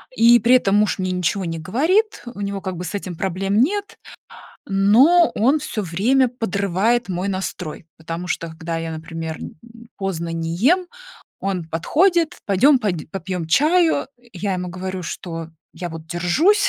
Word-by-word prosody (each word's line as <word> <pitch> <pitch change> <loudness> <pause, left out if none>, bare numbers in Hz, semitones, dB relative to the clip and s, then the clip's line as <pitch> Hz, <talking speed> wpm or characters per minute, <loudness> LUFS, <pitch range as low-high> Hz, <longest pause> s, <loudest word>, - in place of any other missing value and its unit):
И 235 +1 +6
при 240 +4 +5
этом 200 -6 +3
муж 210 0 +2
мне 185 0 -1
ничего 180 +2 -1
не 165 -1 -4
говорит, 320 - +1
у 205 - -8
него 200 0 -3
как 185 -2 -4
бы 180 - -5
с 180 - -5
этим 185 -3 -5
проблем 195 +3 0
нет. 405 - -1 0.7
Но 240 - +5
он 265 +8 +3
всё 220 -6 -4
время 225 +10 +2
подрывает 220 0 0
мой 185 +1 -2
настрой, 185 -4 -4
потому 165 +2 -6
что, 170 -2 -2
когда 160 +1 -5
я, 165 0 -4
например, 160 0 -6
м, - - -9 0.4
поздно 185 -4 -3
не 165 0 -3
ем, 350 - +3 0.5
он 190 -3 -2
подходит: 330 - +1
"Пойдем 255 +9 +5
под 180 -9 -3
попьем 185 -2 -4
чаю". 315 - +3 0.2
Я 195 0 -2
ему 180 0 -4
говорю, 185 +1 -5
что 165 -1 -6 0.2
я 175 - -5
вот 160 0 -9
держусь, 220 - +2
195 Hz, 160 wpm, -21 LUFS, 170-245 Hz, 0.7 s, И